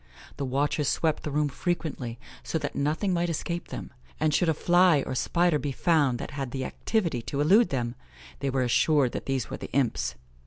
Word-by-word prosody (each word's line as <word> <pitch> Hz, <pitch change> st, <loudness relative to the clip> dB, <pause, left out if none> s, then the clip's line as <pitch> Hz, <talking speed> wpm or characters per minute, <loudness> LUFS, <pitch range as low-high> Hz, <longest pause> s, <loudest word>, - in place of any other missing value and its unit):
The 140 Hz, -, -2 dB
watchers 140 Hz, +2 st, 0 dB
swept 160 Hz, -2 st, +1 dB
the -, -, -4 dB
room 150 Hz, +1 st, +1 dB
frequently, 145 Hz, -6 st, -3 dB, 0.2 s
so -, -, -2 dB
that 145 Hz, -2 st, -3 dB
nothing 160 Hz, +7 st, 0 dB
might 175 Hz, 0 st, +1 dB
escape 170 Hz, +1 st, -3 dB
them; -, -, -7 dB, 0.3 s
and 155 Hz, -1 st, +2 dB
should 175 Hz, +2 st, +3 dB
a -, -, +4 dB
fly 175 Hz, -3 st, +4 dB
or -, -, -3 dB
spider 170 Hz, +4 st, +2 dB
be 145 Hz, -, -2 dB
found 145 Hz, -4 st, +2 dB
that -, -, -6 dB
had 140 Hz, -3 st, -4 dB
the 130 Hz, +1 st, -3 dB
activity 170 Hz, -, -1 dB
to 140 Hz, +4 st, -4 dB
elude 195 Hz, +11 st, +5 dB
them, 120 Hz, -3 st, -2 dB, 0.5 s
they 140 Hz, -, -1 dB
were 130 Hz, -1 st, +1 dB
assured 130 Hz, +2 st, +3 dB, 0.2 s
these 135 Hz, -4 st, -1 dB
were -, -, -3 dB
the -, -, -8 dB
imps. 90 Hz, -, 0 dB
145 Hz, 195 wpm, -27 LUFS, 130-170 Hz, 0.5 s, elude